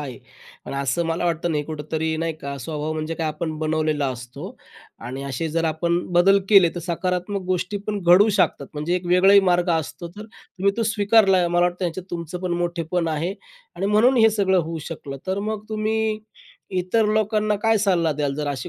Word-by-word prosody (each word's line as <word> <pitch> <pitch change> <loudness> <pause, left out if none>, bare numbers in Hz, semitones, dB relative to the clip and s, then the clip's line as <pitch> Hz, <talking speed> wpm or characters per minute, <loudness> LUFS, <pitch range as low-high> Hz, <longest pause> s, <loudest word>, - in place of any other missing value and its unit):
हा 145 - -5
आहे 125 -3 -8 0.5
आणि 140 - -5
असं 140 +5 0
मला 165 +1 -1
वाटतं 170 0 0
नाही 150 -1 0
कुठेतरी 160 +1 -3
नाही 165 0 -1
का, 140 0 -5
स्वभाव 150 +3 -4
म्हणजे 155 +1 -3
काय? 160 -1 -2
आपण 155 +1 -3
बनवलेला 155 -2 0
असतो 125 0 -9 0.4
आणि 130 +3 -6
असे 140 +4 -3
जर 165 +1 -1
आपण 170 +2 0
बदल 195 +3 +5
केले 195 -5 +7
तर 175 - -4
सकारात्मक 180 +3 -2
गोष्टी 185 +2 -1
पण 210 -1 -2
घडू 180 +5 +6
शकतात. 165 -8 +1
म्हणजे 150 +4 -1
एक 180 -1 -6
वेगळंही 190 +3 +6
मार्ग 175 0 +2
असतो. 165 +1 -2
तर 205 +5 -10
तुम्ही 200 -3 -3
तो 230 - 0
स्वीकारला, 205 -4 +3
मला 175 0 +1
वाटतं 180 +1 -3
ह्याच्यात 175 +2 -4
तुमचं 170 0 -5
पण 180 -2 -2
मोठेपण 170 0 -1
आहे 165 +5 -2 0.4
आणि 195 - -1
म्हणून 225 +5 +4
हे 225 -1 +6
सगळं 190 -3 +2
होऊ 165 +1 -5
शकलं. 140 -4 -7
तर 190 +1 -1
मग 215 0 -3
तुम्ही 215 0 -1 0.6
इतर 195 +5 +1
लोकांना 215 0 +1
काय 225 -1 +3
सल्ला 175 -6 +2
द्याल? 145 -1 -2
जर 150 0 -3
अशी 135 -4 -4
175 Hz, 195 wpm, -22 LUFS, 155-200 Hz, 0.6 s, केले